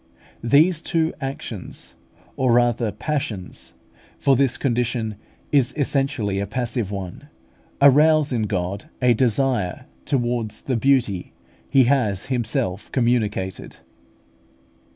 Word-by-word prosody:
These 155 +7 +4
two 165 -1 0
actions, 135 -7 -6 0.4
or 130 -2 +2
rather 120 -2 +2
passions 110 - -4 0.4
for 135 - +3
this 135 -1 +2
condition 120 -4 -1 0.4
is 135 -4 +2
essentially 135 -8 0
a 100 - -2
passive 120 -1 -2
one 100 +8 -7 0.5
arouse 150 +1 +5
in 110 -3 0
God 95 0 -3
a 125 -1 +4
"desire" 120 -4 0 0.2
towards 120 -4 -1
the 130 - -1
"beauty" 115 -7 +1 0.4
He 135 - +5
has 120 -7 +1
Himself 110 -6 -2
communicated. 110 -7 -1
120 Hz, 105 wpm, -22 LUFS, 105-135 Hz, 0.5 s, arouse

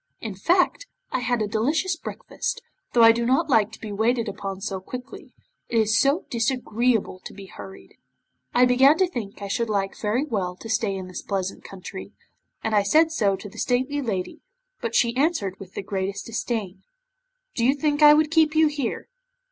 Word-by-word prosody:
In 220 -3 -5
fact, 355 - +1 0.2
I - - 0
had 245 -2 0
a - - -2
delicious 290 - 0
breakfast, - - -5 0.3
though 235 - +5
I 225 - +9
do 235 +1 -1
not 270 +6 +1
like 220 -3 +4
to - - -11
be 215 - -7
waited 225 +3 +1
upon 195 -1 -5
so 195 -1 -4
quickly. 250 +7 -9 0.4
It 235 - 0
is 220 0 +3
so 280 +8 +2
disagreeable 235 -3 0
to - - -10
be 200 -1 -10
hurried. 190 0 -12 0.5
I 250 +1 +5
began 265 +5 +5
to 375 - +4
think 210 - -6
I - - -4
should 225 +3 -1
like 195 -2 -1
very 230 +7 -1
well 190 -10 -2
to 225 - -10
stay 220 -3 0
in 190 -1 -6
this 185 - -7
pleasant 195 -2 -3
country, 190 0 -9 0.5
and 220 - -1
I 205 - +5
said 315 +12 +3
so 205 -11 +1
to 205 - -9
the 195 - -11
stately 260 +4 0
lady, 200 -8 -3 0.4
but 230 -1 -3
she 235 0 +3
answered 260 - 0
with 190 -2 -12
the - - -4
greatest 195 0 -3
disdain: 215 -4 -4 0.7
'"Do 230 - -1
you 265 +4 +4
think 290 0 0
I 295 0 +9
would 310 0 +2
keep 320 -1 +3
you 315 -1 +5
here? 285 -5 -3
230 Hz, 195 wpm, -24 LUFS, 200-270 Hz, 0.7 s, I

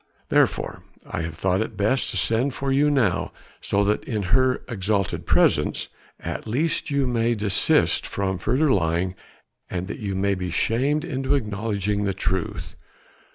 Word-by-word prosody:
Therefore - - +1 0.2
I - - -4
have 80 0 -5
thought 95 +3 +1
it 110 -1 -4
best 110 +7 +1
to - - -3
send 125 +4 +1
for 135 0 -2
you 145 +2 +3
now 120 -11 +1 0.3
so 100 +1 +1
that 105 +1 +1
in 110 -4 -2
her 130 0 +3
exalted 100 -4 -1
presence - - +2 0.3
at - - -5
least 150 +9 0
you 140 -1 +1
may 120 -1 +1
desist 105 -3 +2
from 95 -2 -2
further 135 - +2
lying 90 -1 +1 0.6
and 90 0 -3
that - - -5
you 100 -3 -3
may 100 +1 +1
be 90 -1 -3
shamed 135 - +1
into 135 -1 0
acknowledging 105 -3 -1
the 95 -1 -1
truth. 95 -2 -2
105 Hz, 155 wpm, -24 LUFS, 95-130 Hz, 0.6 s, you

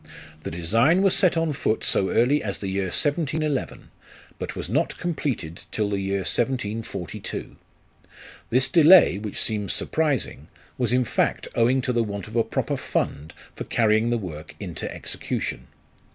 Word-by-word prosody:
The - - -5
design 115 - +2
was 195 - +4
set 180 -3 +3
on 165 -2 +1
foot 110 -4 -1
so 95 - +1
early 135 +6 +3
as 100 -2 -3
the 100 - -5
year 95 0 -1
1711, 150 - -1 0.5
but - - -5
was - - -4
not - - 0
completed 135 - -3
till 105 -2 -1
the 100 - 0
year 95 0 -1
1742. 110 - -3 0.9
This 125 +2 +3
delay, 160 - +7
which 105 -1 -6
seems 105 -3 -1
surprising, 150 -6 -1 0.3
was 125 -2 0
in 125 0 +3
fact 115 - 0
owing 125 +3 +3
to 125 - 0
the 120 -1 +2
want 100 -3 -5
of 110 - -10
a 115 - +4
proper - - -2
fund 75 +3 -3 0.2
for - - -5
carrying 110 0 +2
the 120 - +1
work 80 -8 -7
into - - -5
execution. - - -4
115 Hz, 155 wpm, -24 LUFS, 100-145 Hz, 0.9 s, delay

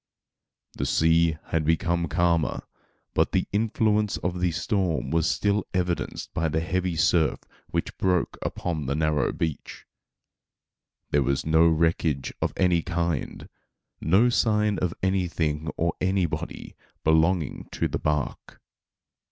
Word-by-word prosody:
The - - -3
sea 80 0 +3
had 80 -1 +1
become 85 +2 +1
calmer, 85 0 +1 0.5
but - - +1
the 95 - +2
influence 105 -1 +1
of 90 0 -3
the 90 0 +2
storm 90 0 -1
was 80 -1 +2
still 105 0 0
evidenced 90 -1 -2
by 80 - 0
the 80 +2 0
heavy 90 +1 -1
surf 80 +1 +2 0.3
which - - -3
broke 90 -2 +1
upon 80 -6 -3
the 70 - 0
narrow 75 -1 +1
beach. 80 -3 -4 1.3
There 75 - +3
was 70 +1 0
no 80 +1 +5
wreckage 80 -4 +1
of - - +1
any 90 -3 +3
kind, 85 -3 -3 0.5
no 100 +10 +4
sign 105 -4 +2
of 90 -2 -1
anything 85 -5 0
or 85 0 +1
anybody 95 -2 -2 0.3
belonging 80 0 +1
to - - 0
the - - -3
bark. 75 -2 -3
85 Hz, 125 wpm, -26 LUFS, 80-95 Hz, 1.3 s, no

